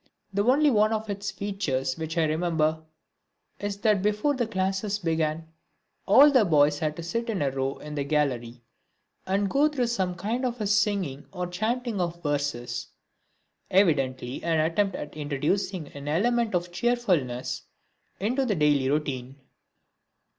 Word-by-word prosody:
The 200 +1 +1
only 280 +5 +4
one 215 -1 +3
of 220 -1 -2
its 200 0 -4
features 145 -11 -2
which 160 +1 -5
I 165 - +4
remember 160 0 +1 0.8
is 205 -1 -3
that 210 -4 +3
before 210 +8 +1
the 245 -4 -1
classes 195 0 -1
began 160 -3 -1 0.6
all 290 +2 +8
the 255 -5 +5
boys 145 -4 +3
had 155 -2 -1
to 170 - -7
sit 230 +8 -3
in 210 -4 -1
a 135 - 0
row 135 0 -2
in 150 0 -8
the 145 -1 -1
gallery 125 -5 -1 0.6
and 195 +2 +1
go 280 +9 +3
through 280 -5 0
some 190 -6 -1
kind 220 +8 -2
of 240 -4 -1
singing 200 -9 0
or 180 -2 -3
chanting 220 +4 -2
of 170 0 -3
verses 145 -5 -2 0.8
evidently 135 -9 +1
an 165 -1 +1
attempt 180 +5 +1
at 150 - -7
introducing 155 +4 -2
an 140 0 -9
element 225 +7 +1
of 175 0 -1
cheerfulness 175 - 0 0.6
into 245 +8 0
the 225 -6 0
daily 145 -4 +3
routine. 135 -3 -2
180 Hz, 150 wpm, -26 LUFS, 150-210 Hz, 0.8 s, all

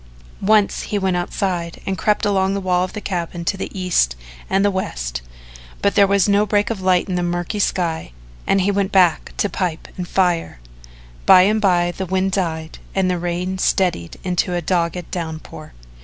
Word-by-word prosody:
Once 210 0 +3
he 210 - 0
went 190 -2 0
outside 175 -1 -2
and 195 - -1
crept 210 +2 +1
along 195 -1 +1
the - - -1
wall 180 -1 +1
of 185 - -4
the 210 - -4
cabin 175 -3 -4
to 195 - 0
the 190 - -5
east 170 - +2 0.3
and 195 +1 +2
the 205 - +3
west, - - -3 0.6
but 200 - +1
there 200 -1 +5
was 200 -1 +3
no 205 0 +4
break 205 +1 +1
of 205 -4 -4
light 185 0 +2
in 185 - -3
the 180 - 0
murky 175 +4 -2
sky 170 - -1 0.4
and 195 - +3
he 195 +2 +2
went 200 -1 0
back 180 -4 +3
to - - +1
pipe 180 -5 -3
and 180 -1 -4
fire. 175 - 0 0.7
By 180 - +9
and 215 +3 +2
by 175 -3 +3
the 190 +1 -5
wind 190 +1 0
died 165 -4 -3 0.2
and 190 -1 +2
the 180 - -1
rain 175 +2 -2
steadied 175 - 0
into 180 -1 0
a - - +1
dogged 170 0 -1
downpour. 160 - -6
185 Hz, 190 wpm, -20 LUFS, 175-195 Hz, 0.7 s, By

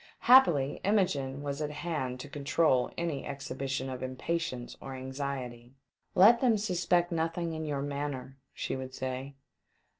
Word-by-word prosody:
Happily, 170 - +5
Imogene 145 -9 +1
was 140 +1 -3
at 150 - -1
hand 150 -5 -3
to 145 - -8
control 140 -2 +2
any 165 -5 -2
exhibition 135 -1 -4
of 130 -1 -5
impatience 130 0 -3
or 135 - -6
anxiety. 130 -2 -5 0.2
" - - -46
Let 225 +6 +7
them 240 -4 +4
suspect 180 -3 +1
nothing 165 0 -1
in 160 0 -4
your 140 -2 -2
man 145 0 -2
ner," 130 +1 -9
she - - -3
would 130 0 -6
say. 130 +1 -4
140 Hz, 150 wpm, -30 LUFS, 130-170 Hz, 0.2 s, Let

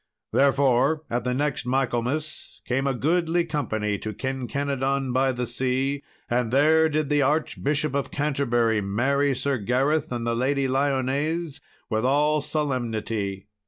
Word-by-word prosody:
Therefore, 140 +2 +3
at 120 0 -1
the 125 - 0
next 145 0 -1
Michaelmas, 130 +3 -2
came 135 +2 0
a 135 - +1
goodly 170 +4 +1
company 110 - -2
to 110 - -5
Kinkenadon 135 0 -2
by 130 +1 +2
the 125 -1 -3
Sea. 130 +3 -1 0.3
And 120 -1 0
there 160 +4 +4
did 155 -1 0
the 145 -1 +3
Archbishop 150 0 0
of 140 -1 -1
Canterbury 120 -7 +1
marry 135 +8 +1
Sir 135 0 -1
Gareth 135 +8 +1
and 120 -1 -3
the 115 - 0
Lady 135 +3 +1
Lyones 140 +4 -1 0.3
with 110 -1 -1
all 150 +3 +2
solemnity. 115 -9 -2
135 Hz, 135 wpm, -25 LUFS, 125-145 Hz, 0.3 s, there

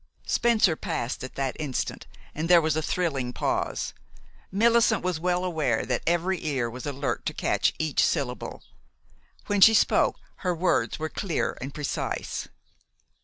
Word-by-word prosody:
Spencer 220 -8 +3
passed 120 -5 -3
at 130 - -7
that 135 -2 -2
instant, 145 -5 -3 0.3
and 160 +3 -3
there 175 -1 +8
was 155 -2 +1
a 160 - +1
thrilling 140 -8 -1
pause. - - -1 0.6
Millicent 230 +1 +3
was 180 -3 -1
well 180 +1 0
aware 150 -10 0
that - - -1
every 175 +2 +1
ear 130 -7 -1
was 125 +3 -7
alert 140 0 -2
to - - -3
catch - - +1
each 155 -2 +1
syllable. 125 -3 -2 0.8
When 205 -1 0
she 220 +3 +9
spoke, - - +3 0.2
her 180 -2 -1
words 180 +2 +1
were 155 0 -3
clear 180 -1 -2
and 135 +2 -5
precise. 150 -1 -3
160 Hz, 150 wpm, -26 LUFS, 135-180 Hz, 0.8 s, she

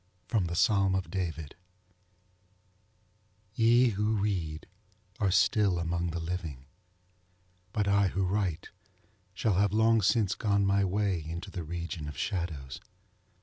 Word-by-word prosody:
_ 110 -6 +1
ŌĆö_Psalm 95 +2 +2
of 95 - -5
David_. 85 -5 -3 2.0
Ye 120 +2 +4
who 105 +1 0
read 90 -7 -2 0.5
are 100 - +2
still 95 0 +3
among 85 +1 -1
the 85 +1 -3
living; 80 -6 -5 1.1
but 105 -1 -1
I 100 0 +3
who 95 +1 -1
write 90 -3 -1 0.7
shall 100 -3 +1
have 100 0 +3
long 110 +1 +4
since 100 0 +2
gone 100 -3 +1
my 100 0 +3
way 95 -3 0
into 85 +5 -6
the 90 - -5
region 85 -1 -5
of 75 - -7
shadows. 80 -8 -4
95 Hz, 125 wpm, -29 LUFS, 85-105 Hz, 2.0 s, Ye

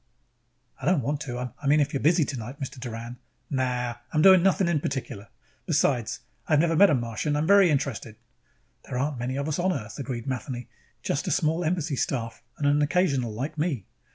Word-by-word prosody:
"I - - -3
don't 175 -8 +3
want 145 +4 -2
to 125 -3 -4
I 140 - -3
mean 150 +2 +5
if 145 0 +1
you're 140 - 0
busy 160 +1 +4
tonight, 130 +1 -6
Mr. 135 -2 -6
Doran 120 0 -6 0.2
" 120 - -44
"Nah. 130 -2 +1 0.3
I 120 - -10 0.2
am 155 - +4
not - - +2
doing 190 -2 +8
one 195 -1 +5
thing 190 - +1
in 170 -3 +2
particular. 130 -7 -4 0.4
Besides, 140 -7 +1 0.3
I - - +1
have 145 - +5
never 165 +1 +2
met 200 +4 +7
a 145 - +4
Martian. 120 +5 -2
I - - +1
am - - 0
very 200 0 +6
interested." 135 -7 -2 0.7
"There 125 - -4
aren't 140 0 -1
many 125 +2 -2
of 140 +2 -2
us 155 +2 -2
on 185 +2 +2
Earth," 110 -9 -5
agreed 125 -4 -4
Matheny. 125 -2 -4 0.3
"Just - - -1
a - - 0
small 160 +3 +1
embassy 160 -4 -1
staff 115 -4 -2 0.2
and 145 - -2
an 145 +1 +3
occasional 145 -7 +1
like 140 +8 -5
me." 145 - -1
140 Hz, 220 wpm, -26 LUFS, 125-155 Hz, 0.7 s, doing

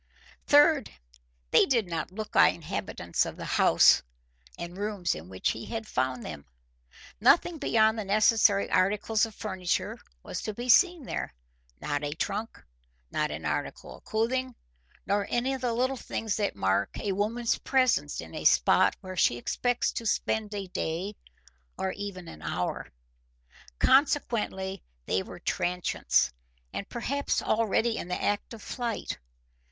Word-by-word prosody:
Third, 295 -2 +5 0.6
they - - +6
did 235 -7 +2
not 165 0 -3
look 215 +3 -6
like - - +6
inhabitants - - -2
of - - -6
the - - -6
house - - +5 0.6
and 170 +1 -6
rooms 200 -3 -1
in 80 +3 -9
which 95 0 -1
he 115 - -7
found 130 - -2
them. 75 -4 -8 0.7
Nothing 320 - +4
beyond 220 -5 +3
the - - -2
necessary 205 0 +4
articles 210 +4 +2
of 220 - -14
furniture 190 -4 -2 0.2
was - - -5
to 215 - -4
be 245 +2 -5
seen 340 +7 +5
there; - - -4 0.5
not 145 -1 -2
a 145 0 -2
trunk, 210 +6 -4 0.5
not - - 0
an - - -6
article - - -3
of - - -22
clothing, 250 +3 -1 0.5
nor 200 +1 0
any 250 +3 0
of 265 - -4
the 245 -2 0
little 255 +3 0
things 225 -2 -3
that 205 -2 -1
mark 95 +1 +1
a 205 - -2
woman's 225 +4 0
presence 255 - +1
in 80 0 -11
a - - -5
spot - - +4
where 185 0 -7
she 120 -8 +3
expects 245 - 0
to 230 - -4
spend 215 0 0
a 200 -1 -3
day 180 +4 -3 0.6
or 190 - -1
even 185 -4 -6
an 80 - -10
hour. 80 +3 -3 0.9
Consequently 225 - +2 0.2
they 95 - +1
were - - -9
transients 175 - 0 0.4
and 200 - -5
perhaps 280 +4 -1
already 225 +1 +1
in - - -5
the 180 - -2
act 205 +3 -1
of 220 - -13
flight. 235 -3 -4
210 Hz, 150 wpm, -28 LUFS, 180-235 Hz, 0.9 s, they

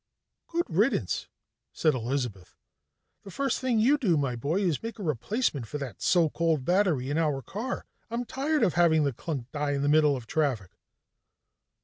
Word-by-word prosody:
"Good 340 +1 -1
riddance," 205 +10 0 0.5
said 155 -2 +2
Elizabeth. 120 -6 -3 0.6
"The 200 - -11
first 275 +8 -1
thing 255 -3 +1
you 265 +7 +4
do, 185 - +2
my 135 -4 0
boy, 150 - -1
is 175 -7 0
make 230 0 -6
a 205 - -6
replacement 155 - -1
for 150 - -4
that 140 -4 -7
so 175 -3 +4
called 160 -3 0
battery 175 -8 +2
in 150 - +1
our 145 -5 0
car. 220 +6 -4 0.2
I'm 235 +2 -2
tired 290 +5 0
of 180 - +3
having 165 -3 +4
the 140 -2 0
clunk 130 -2 -5
die 145 -1 -1
in 140 0 -1
the 145 - +2
middle 150 -1 +4
of 125 -3 -7
traffic." 125 - -1
155 Hz, 175 wpm, -28 LUFS, 140-205 Hz, 0.6 s, you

